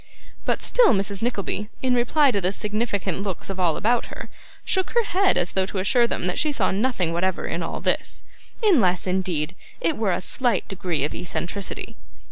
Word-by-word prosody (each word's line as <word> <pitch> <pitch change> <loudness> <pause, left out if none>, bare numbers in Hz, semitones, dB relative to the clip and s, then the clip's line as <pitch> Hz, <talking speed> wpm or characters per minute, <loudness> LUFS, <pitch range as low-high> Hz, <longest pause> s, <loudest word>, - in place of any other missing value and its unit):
But - - 0
still - - +5
Mrs. 195 0 -1
Nickleby, 210 -3 -2
in 255 -1 +3
reply 265 +4 +4
to 200 - 0
the 180 +1 +1
significant 205 -3 -1
looks 195 -1 -4
of 190 - -6
all 170 -4 +2
about 235 +2 +1
her, - - -8 0.4
shook 375 -1 0
her 475 - +5
head 385 -1 +2
as 175 - 0
though 190 -1 0
to 200 - -5
assure 235 +6 +3
them - - -2
that 180 - -1
she 305 - +2
saw 220 -9 +1
nothing 195 -5 0
whatever 185 +2 0
in - - -2
all - - -4
this, - - -1 0.4
unless, 220 - +4
indeed, 180 -4 0 0.3
it 165 - 0
were 215 -4 +1
a - - 0
slight 235 +1 0
degree 175 -6 -2
of 150 - -1
eccentricity. 180 +2 -4
195 Hz, 190 wpm, -24 LUFS, 180-240 Hz, 0.4 s, still